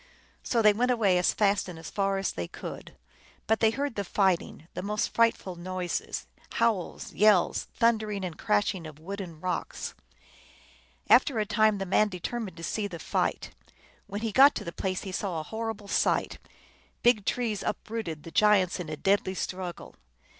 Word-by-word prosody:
So 230 -2 +1
they 210 -1 +7
went 245 +4 +1
away 205 -7 +3
as 180 - +3
fast 200 -2 +1
and 175 - -8
as 160 - -9
far 195 -1 0
as 195 -1 -1
they 85 -1 -4
could, - - -8 0.5
but 220 0 +2
they 220 - +5
heard 275 +4 -2
the 200 - -1
fighting, 185 -4 0
the - - -4
most 210 +2 -1
frightful 230 -5 +2
noises, 180 0 -3 0.3
howls, 225 -6 0
yells, 205 -4 +4
thundering 215 -4 +1
and 175 -3 -5
crashing 165 - 0
of 155 -2 -11
wood 195 +6 -6
and 170 -5 -9
rocks. 185 - -3 1.1
After 250 0 +5
a 215 - +1
time 215 0 +3
the 195 - -3
man 210 +3 +3
determined 190 +1 -5
to 165 - -9
see 205 +4 -2
the 175 -4 -7
fight. 160 - -1 0.6
When 205 +2 -5
he 225 -1 -1
got 275 +5 +7
to - - -3
the 170 - -5
place 185 +1 -2
he 190 - -5
saw 185 -3 -2
a - - -4
horrible 220 +2 -5
sight: - - +1 0.6
big 240 -4 +4
trees 220 -2 -1
uprooted, 210 -9 -4
the 165 - -9
giants 205 -4 +4
in 170 -3 -5
a 155 - -4
deadly 195 +2 +1
struggle. 185 -1 -5
200 Hz, 175 wpm, -28 LUFS, 180-220 Hz, 1.1 s, they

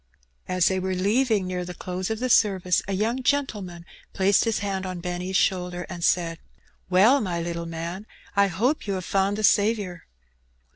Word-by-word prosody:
As 185 -2 +2
they 190 -1 +1
were 185 0 -2
leaving, 210 +2 +1
near 180 -1 -3
the 180 0 -7
close 180 +1 -4
of 220 - -2
the 255 +3 -1
service, 190 -7 +3
a 195 - -2
young 225 +6 0
gentleman 210 -12 -1 0.3
placed 195 +3 +3
his 225 -1 +1
hand 195 -2 -2
on 185 -2 -5
Benny's 180 +1 -4
shoulder, 180 -1 0
and 175 -2 -6
said 165 -2 +1 0.3
— - - -36
Well, 215 +10 +5
my 180 -5 -2
little 170 0 -4
man, 170 +5 -6 0.3
I 200 0 +4
hope 225 - -1
you 200 - -1
have 185 -2 -5
found 195 +1 +1
the 215 - -3
Saviour.'' 205 -4 +1
190 Hz, 185 wpm, -25 LUFS, 180-210 Hz, 0.3 s, Well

